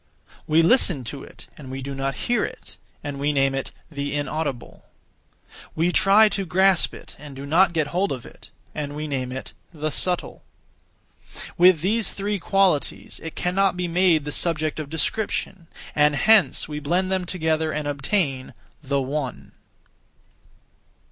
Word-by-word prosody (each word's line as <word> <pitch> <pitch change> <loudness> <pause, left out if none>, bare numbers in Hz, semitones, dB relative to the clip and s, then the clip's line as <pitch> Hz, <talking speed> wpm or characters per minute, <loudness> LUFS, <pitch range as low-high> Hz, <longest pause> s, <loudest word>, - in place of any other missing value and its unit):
We 160 +2 +4
listen 175 - +4
to 135 +4 -6
it, - - -13
and 135 -3 -10
we 135 0 -6
do 140 +1 -5
not 135 0 -2
hear 240 - +1
it, - - -7 0.3
and 140 -1 -5
we 145 +1 +1
name 135 -1 +2
it 135 0 -3 0.2
'the 145 -1 -3
Inaudible.' 145 -3 -4 0.9
We 170 +3 +2
try 195 +4 +6
to 200 -1 -2
grasp 190 +1 +3
it, - - -12
and 145 -2 -10
do 135 +1 -7
not 170 +5 +4
get 155 -3 0
hold 190 +3 +1
of 130 -3 -5
it, - - -14 0.2
and 145 -1 -5
we 155 +1 -4
name 130 -3 -3
it 130 +1 -7 0.2
'the 155 0 -2
Subtle.' 180 +3 -1 1.1
With 180 -3 +5
these 215 +5 +1
three 205 0 -2
qualities, 190 -5 0
it 160 - -7
cannot 185 +1 +1
be 180 -1 -1
made 170 -3 +3
the 150 - -4
subject 155 -1 0
of 150 -2 -5
description; 185 +1 -2 0.3
and 150 0 +3
hence 215 +4 +4
we 150 -1 -5
blend 175 +6 0
them 185 -1 0
together 160 -3 0
and 150 -1 -3
obtain 140 -2 -1 0.3
The 140 -1 -1
One. 135 -1 -4
155 Hz, 160 wpm, -23 LUFS, 140-185 Hz, 1.1 s, try